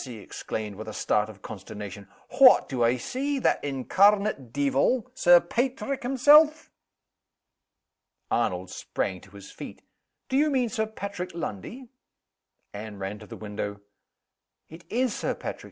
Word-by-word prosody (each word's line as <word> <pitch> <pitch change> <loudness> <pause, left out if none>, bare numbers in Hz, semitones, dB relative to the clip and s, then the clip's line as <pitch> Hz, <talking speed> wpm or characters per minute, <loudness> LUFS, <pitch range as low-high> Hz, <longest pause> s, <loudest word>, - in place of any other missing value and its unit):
he 125 -3 -8
exclaimed, 105 0 -6
with 110 +1 -8
a 110 - -6
start 105 +1 0
of 105 -2 -13
consternation, 100 0 -8 0.3
"what 260 -2 +8
do 125 -3 -1
I 120 +2 +3
see? 275 - -2
That 260 - +1
incarnate 145 - +2
deevil, 140 - +1
Sir 175 -8 +6
Paitrick 260 +8 -2
himself!" 295 +5 +5 1.6
Arnold - - -1
sprang - - -3
to - - -17
his - - -11
feet. - - -10 0.4
"Do 265 - 0
you 305 +2 +3
mean 255 -4 +1
Sir 220 0 -1
Patrick 200 -5 -6
Lundie?" 200 - -6 0.8
Anne 105 0 -7
ran 100 +2 -5
to 105 - -12
the - - -9
window. 105 -1 -5 0.9
"It 165 +2 -13
is 245 0 0
Sir - - -2
Patrick!" - - -6
170 Hz, 140 wpm, -26 LUFS, -, 1.6 s, what